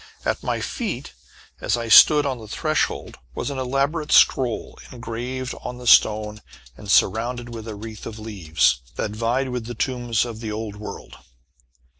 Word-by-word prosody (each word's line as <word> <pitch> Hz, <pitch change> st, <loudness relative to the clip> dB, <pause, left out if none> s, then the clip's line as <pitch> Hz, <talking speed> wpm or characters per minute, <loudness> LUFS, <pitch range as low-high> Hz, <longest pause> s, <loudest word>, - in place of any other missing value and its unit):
At -, -, -1 dB
my -, -, -2 dB
feet, 195 Hz, -, -4 dB, 0.5 s
as -, -, 0 dB
I 115 Hz, -1 st, -4 dB
stood 150 Hz, +6 st, +8 dB
on 130 Hz, -3 st, -2 dB
the 110 Hz, -, -10 dB
threshold, 155 Hz, +7 st, -2 dB, 0.2 s
was -, -, -3 dB
an 135 Hz, -, -4 dB
elaborate 140 Hz, +4 st, -1 dB
scroll 125 Hz, -4 st, +3 dB
engraved 125 Hz, +2 st, -5 dB
on 125 Hz, 0 st, -6 dB
the 125 Hz, -, -10 dB
stone 105 Hz, -2 st, +4 dB, 0.3 s
and 105 Hz, +5 st, -11 dB
surrounded 120 Hz, +5 st, +2 dB
with 115 Hz, -1 st, -7 dB
a 110 Hz, -, -5 dB
wreath 110 Hz, +1 st, -8 dB
of 110 Hz, -, -7 dB
leaves, 95 Hz, -, 0 dB
that -, -, -2 dB
vied 120 Hz, +5 st, -1 dB
with 125 Hz, -2 st, -4 dB
the 120 Hz, -, -6 dB
tombs 120 Hz, -1 st, 0 dB
of 115 Hz, -2 st, -7 dB
the 110 Hz, -2 st, -5 dB
old 105 Hz, -1 st, -5 dB
world. 105 Hz, -, -9 dB
120 Hz, 165 wpm, -23 LUFS, 110-130 Hz, 0.5 s, stood